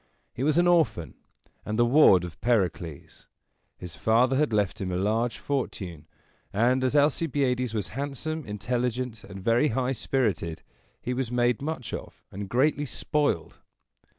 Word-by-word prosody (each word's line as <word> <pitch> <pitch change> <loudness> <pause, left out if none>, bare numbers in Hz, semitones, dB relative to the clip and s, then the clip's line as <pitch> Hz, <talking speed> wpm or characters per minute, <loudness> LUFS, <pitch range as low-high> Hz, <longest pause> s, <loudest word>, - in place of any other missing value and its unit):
He - - -6
was 150 +3 +2
an 175 - +5
orphan, 110 - +2 0.5
and 110 0 -3
the 120 - +4
ward 120 - +6
of 85 -3 -8
Pericles. 90 - -1 0.5
His 90 -3 -9
father 115 - +3
had 150 -1 +2
left 105 -3 0
him 95 -1 -2
a - - -1
large 110 +5 0
fortune; 95 - -4 0.4
and, 125 +5 +2
as 130 +2 +1
Alcibiades 135 -5 +1
was 100 -6 -2
handsome, 145 - -4
intelligent, 120 +2 -3
and 95 -1 -10
very 120 +7 +3
high 130 0 0
spirited, 105 - -1 0.4
he 125 - -2
was 125 -2 -2
made 120 -1 +1
much 145 -5 -4
of - - -8
and 100 0 -6
greatly 145 +5 +2
spoiled. 145 - -1
120 Hz, 150 wpm, -27 LUFS, 100-135 Hz, 0.5 s, ward